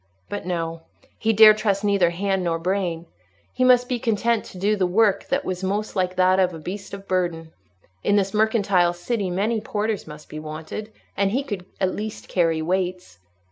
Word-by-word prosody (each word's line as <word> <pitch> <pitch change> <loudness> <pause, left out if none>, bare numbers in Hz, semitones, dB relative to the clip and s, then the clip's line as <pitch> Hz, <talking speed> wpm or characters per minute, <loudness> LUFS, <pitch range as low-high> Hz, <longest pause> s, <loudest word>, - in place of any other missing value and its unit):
But 205 -3 -5
no! 165 -2 -3 0.4
he 225 - +2
dared 215 0 +8
trust 200 -2 0
neither 200 -4 +3
hand 190 +2 -1
nor 170 -1 0
brain. 175 -1 -2 0.5
He 255 - 0
must 250 -1 +5
be 250 -1 -1
content 230 0 +1
to - - -11
do 205 +3 +1
the 190 -3 +1
work 205 +2 +2
that 275 +1 -1
was 185 0 -3
most 205 +3 -2
like 185 -1 0
that 185 +1 +4
of 180 -2 +2
a - - -8
beast 195 +5 -6
of 195 0 -12
burden: 170 -3 -1 0.5
in 205 - +3
this 195 -1 +1
mercantile 200 -5 +2
city 190 +3 -2
many 210 +5 0
porters 210 -2 -2
must 150 0 -11
be 155 - -7
wanted, 155 +8 -7 0.2
and 200 -1 +2
he 260 +7 0
could 200 -9 -6
at 190 -1 +1
least 215 0 -6
carry 165 -3 +1
weights. 180 - -2
190 Hz, 190 wpm, -23 LUFS, 175-215 Hz, 0.5 s, dared